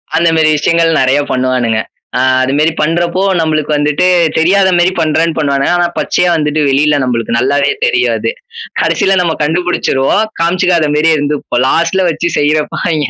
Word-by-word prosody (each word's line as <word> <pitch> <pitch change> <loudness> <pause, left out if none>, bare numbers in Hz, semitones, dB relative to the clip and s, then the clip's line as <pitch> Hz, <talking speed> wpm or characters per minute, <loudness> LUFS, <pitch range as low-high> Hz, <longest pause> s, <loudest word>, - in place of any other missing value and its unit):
அந்தமாரி 165 -1 +2
விஷயங்கள் 165 +1 +1
நெறைய 130 +2 +2
பண்ணுவானுங்க. 125 -3 0 0.4
ஆ - - 0 0.2
அதுமாரி 145 +5 +1
பண்றப்போ 170 +3 -1 0.2
நம்மளுக்கு 155 -2 -1
வந்துட்டு 150 +4 0 0.3
தெரியாத 190 +4 +3
மாரி 175 +1 +2
பண்றேன்னு 160 0 0
பண்ணுவானுங்க. 140 -1 0
ஆனா 175 0 +1
பச்சையா 180 - 0
வந்துட்டு 150 -1 -1
வெளில 145 +2 +2
நம்மளுக்கு 115 -2 -2
நல்லாவே 140 +3 +1
தெரியும் 405 -6 +1
அது. - - -2 0.5
கடைசில 195 0 +1
நம்ம 170 -2 0
கண்டுபிடிச்சிருவோம். 160 +1 0 0.2
காமிச்சுக்காதமாரியே 165 -3 +1
இருந்துப்போம். 145 -4 -2
லாஸ்ட்டுல 170 +6 +1
வச்சு 170 +2 -2
செய்யிறப்ப 150 +1 0
அவெங்க 155 -4 -1
155 Hz, 140 wpm, -12 LUFS, 145-170 Hz, 0.5 s, தெரியாத